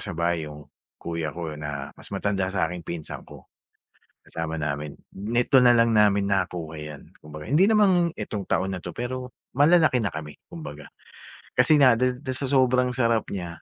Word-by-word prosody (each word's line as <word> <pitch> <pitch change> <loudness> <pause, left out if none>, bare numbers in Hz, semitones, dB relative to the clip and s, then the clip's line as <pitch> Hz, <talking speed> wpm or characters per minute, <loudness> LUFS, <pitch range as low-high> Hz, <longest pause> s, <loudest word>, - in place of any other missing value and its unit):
sa 100 -5 -6
bahay 85 -2 -1
yung 75 0 -11 0.3
kuya 85 -2 -4
ko 85 -2 -5
na 70 -2 -5
mas - - -12
matanda 100 -1 -1
sa'king 90 -2 -2
pinsan 85 -2 -6
ko, - - -13 0.8
kasama 80 0 -4
namin. 75 -1 -4 0.2
Nito 120 +6 +2
na 120 -1 +6
lang 115 0 +4
namin 105 -2 +4
nakuha 85 -4 -2
yan. 75 -1 -10
Kumbaga, 75 0 -10
hindi 155 - +3
naman 195 -6 +4
itong 100 -3 -5
taon 95 +1 0
na 90 - -4
'to, - - -7
pero 125 +1 -4 0.2
malalaki 150 -1 +4
na 105 - 0
kami 75 -1 -6 0.2
kumbaga, 115 - -9 0.7
kasi 155 - +6
na 125 -4 +6
dis 125 +1 +2
do'n 130 -2 -3
sa 140 - -2
sobrang 130 -2 +3
sarap 115 -3 +2
niya. 90 -3 -4
100 Hz, 170 wpm, -25 LUFS, 80-125 Hz, 0.8 s, na